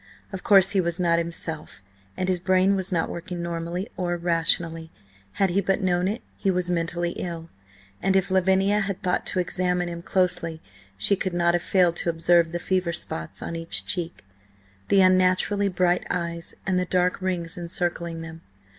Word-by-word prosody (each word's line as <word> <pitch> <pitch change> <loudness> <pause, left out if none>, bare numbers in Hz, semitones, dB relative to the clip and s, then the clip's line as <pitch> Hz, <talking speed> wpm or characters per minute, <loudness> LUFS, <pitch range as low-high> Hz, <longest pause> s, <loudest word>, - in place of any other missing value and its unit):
Of 190 - -4
course 195 -2 +6
he 195 -2 +3
was 170 0 -2
not 170 -1 +3
himself, 165 - -4 0.3
and 185 - -1
his 185 -1 +1
brain 185 +2 +3
was 190 0 -2
not 165 -3 +1
working 175 0 -5
normally 170 +3 -3
or 175 -1 -1
rationally; 165 -1 +1 0.4
had 195 -2 +1
he 195 +3 +2
but 195 +1 +1
known 180 -2 +1
it, 215 +5 -3
he 195 - 0
was 180 -1 0
mentally 175 0 -1
ill, 165 -2 -5 0.5
and 195 0 +2
if 190 0 +2
Lavinia 190 +2 +3
had 195 -2 -3
thought 180 - 0
to - - -4
examine 180 0 0
him 170 0 -6
closely 180 -3 0 0.4
she 105 - +2
could 185 -1 -3
not 170 0 +2
have 175 - +1
failed 180 -3 +3
to - - -1
observe 165 0 +3
the 175 - -2
fever 185 0 0
spots 80 - -5
on 170 - -4
each 165 0 -2
cheek, 170 - -4 0.6
the 195 - +5
unnaturally 185 +2 +3
bright 180 -1 +1
eyes 170 -1 -3
and 185 -1 +1
the 180 - 0
dark 180 +1 +1
rings 180 -2 -2
encircling 170 -1 -3
them. 165 0 -9
175 Hz, 180 wpm, -25 LUFS, 170-185 Hz, 0.6 s, course